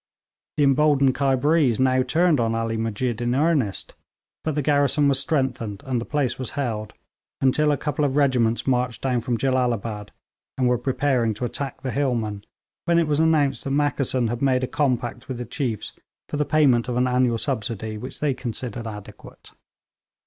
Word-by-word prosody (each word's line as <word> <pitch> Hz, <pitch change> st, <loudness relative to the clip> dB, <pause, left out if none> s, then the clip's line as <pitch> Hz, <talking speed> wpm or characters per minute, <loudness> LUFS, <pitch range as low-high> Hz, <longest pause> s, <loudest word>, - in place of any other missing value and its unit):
The 150 Hz, -, +3 dB
emboldened 140 Hz, -1 st, +4 dB
Khyberees 140 Hz, -1 st, +2 dB
now 130 Hz, 0 st, +3 dB
turned 165 Hz, +2 st, +2 dB
on 115 Hz, -1 st, +1 dB
Ali 115 Hz, 0 st, -1 dB
Musjid 115 Hz, +1 st, -2 dB
in 120 Hz, +1 st, 0 dB
earnest; 145 Hz, -, 0 dB, 0.5 s
but 155 Hz, -2 st, -2 dB
the 150 Hz, -, 0 dB
garrison 145 Hz, 0 st, +3 dB
was 135 Hz, -1 st, +2 dB
strengthened, 130 Hz, -8 st, -2 dB
and 125 Hz, -3 st, -1 dB
the -, -, -5 dB
place 145 Hz, -5 st, -1 dB
was 130 Hz, -, -3 dB
held 110 Hz, -6 st, -3 dB, 0.5 s
until 150 Hz, +3 st, +3 dB
a 145 Hz, -, +1 dB
couple 150 Hz, 0 st, -2 dB
of 140 Hz, -2 st, 0 dB
regiments 125 Hz, -5 st, +2 dB
marched 125 Hz, -3 st, 0 dB
down 125 Hz, -3 st, +1 dB
from 120 Hz, 0 st, -1 dB
Jellalabad, 115 Hz, -5 st, -1 dB, 0.5 s
and 130 Hz, -1 st, +2 dB
were 125 Hz, -1 st, +2 dB
preparing 125 Hz, -3 st, 0 dB
to 120 Hz, -, -3 dB
attack 135 Hz, +2 st, -5 dB
the 130 Hz, -2 st, -3 dB
hillmen, 115 Hz, -7 st, -1 dB, 0.4 s
when 170 Hz, 0 st, +3 dB
it 170 Hz, -, +3 dB
was 150 Hz, -1 st, 0 dB
announced 155 Hz, -4 st, +2 dB
that 135 Hz, -, -2 dB
Mackeson 135 Hz, -4 st, +1 dB
had 120 Hz, +1 st, -3 dB
made 130 Hz, -2 st, +2 dB
a -, -, 0 dB
compact 125 Hz, -3 st, -1 dB
with 130 Hz, -4 st, -4 dB
the 120 Hz, -, -5 dB
chiefs 120 Hz, -3 st, -3 dB, 0.3 s
for -, -, -4 dB
the 150 Hz, -, +1 dB
payment 135 Hz, -7 st, +3 dB
of 120 Hz, -, -1 dB
an 125 Hz, -, +3 dB
annual 125 Hz, -2 st, +2 dB
subsidy 110 Hz, -4 st, -3 dB
which 130 Hz, -, -8 dB
they 145 Hz, -2 st, +2 dB
considered 120 Hz, -2 st, -5 dB
adequate. 105 Hz, -2 st, -11 dB
130 Hz, 180 wpm, -23 LUFS, 115-145 Hz, 0.5 s, emboldened